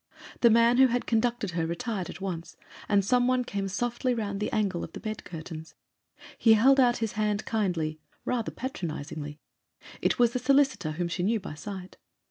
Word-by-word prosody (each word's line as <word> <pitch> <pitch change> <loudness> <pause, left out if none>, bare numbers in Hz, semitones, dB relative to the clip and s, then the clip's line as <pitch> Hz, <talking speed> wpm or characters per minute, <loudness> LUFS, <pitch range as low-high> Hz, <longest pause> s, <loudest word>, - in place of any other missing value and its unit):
The 235 - +6
man 230 +2 +5
who 265 0 +7
had 245 0 -1
conducted 235 -2 0
her 165 -1 -1
retired 195 +2 -3
at - - -8
once, 180 -4 -5 0.3
and 200 -2 +3
some 245 +3 +3
one 255 0 +2
came 200 -5 -3
softly 240 +5 -1
round 200 -3 -3
the 210 - -2
angle 195 -5 0
of 165 - -8
the - - -7
bed 215 -1 -5
curtains. 160 -1 -8 0.6
He 225 - +6
held 265 +6 +5
out 245 -2 +4
his 215 - -5
hand 215 0 -1
kindly—rather 190 +3 -2
patronisingly: 155 - -5 0.6
it - - +2
was 240 -1 +4
the 250 - 0
solicitor 270 - +2
whom 175 +2 -2
she 175 +1 -3
knew 220 +5 +1
by 190 - -7
sight. 185 +4 -8
210 Hz, 180 wpm, -28 LUFS, 175-240 Hz, 0.6 s, who